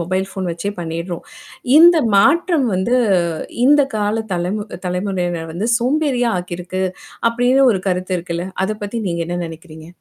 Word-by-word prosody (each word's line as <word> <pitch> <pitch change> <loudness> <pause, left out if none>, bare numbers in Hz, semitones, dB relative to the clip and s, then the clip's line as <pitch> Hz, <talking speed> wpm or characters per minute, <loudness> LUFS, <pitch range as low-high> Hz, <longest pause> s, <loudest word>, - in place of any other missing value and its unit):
Mobile 185 +3 -1
phone 190 -2 -4
வச்சே 170 +4 -3
பண்ணிடுறோம். 170 +1 -4 0.6
இந்த 340 +1 +8 0.2
மாற்றம் 295 - +3
வந்து 190 +7 0 0.7
இந்த 290 +2 +6
கால 210 +2 0
தலைமு 180 +4 -2 0.2
தலைமுறையினர் 180 -3 -2
வந்து 205 +7 -2
சோம்பேறியா 255 -2 +1
ஆக்கியிருக்கு. 180 +1 -5 0.5
அப்படின்னு 245 +3 +2
ஒரு 190 - -2
கருத்து 185 0 -1
இருக்குல்ல. 170 +1 -4 0.2
அத 215 +2 -3
பத்தி 230 +3 -4
நீங்க 170 -1 -2
என்ன 175 - -2
நினைக்கிறீங்க? 160 -1 -11
190 Hz, 140 wpm, -18 LUFS, 175-235 Hz, 0.7 s, இந்த